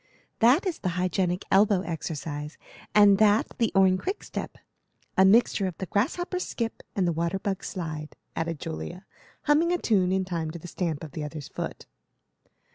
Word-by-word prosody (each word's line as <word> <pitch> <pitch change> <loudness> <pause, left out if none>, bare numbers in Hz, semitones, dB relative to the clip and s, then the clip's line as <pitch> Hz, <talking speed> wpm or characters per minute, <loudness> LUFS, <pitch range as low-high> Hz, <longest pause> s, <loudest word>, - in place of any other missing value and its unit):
"That 250 - +5
is 360 -4 -2
the 180 -2 -2
hygienic 180 0 0
elbow 200 -1 +5
exercise, 155 -3 -5 0.4
and 205 -1 +7
that 215 0 +5
the 230 -2 +2
Orne 190 -1 +5
Quickstep, 390 - -5 0.6
a 190 - +6
mixture 200 0 +4
of 180 - -6
the 190 - -4
grasshopper's 350 - -1
skip 230 -1 -4
and 185 -3 +1
the - - +2
water 170 +3 -1
bug's 195 0 -3
slide," 155 -4 -5 0.2
added 165 -2 -2
Julia, 80 - -6 0.4
humming 310 +4 +3
a 355 - +2
tune 190 - +2
in 190 0 +1
time 165 -3 -3
to 165 - -6
the 170 - -10
stamp 165 -3 -3
of 155 - -8
the 150 - -5
other's 150 -1 -6
foot. - - -6
185 Hz, 170 wpm, -27 LUFS, 165-210 Hz, 0.6 s, and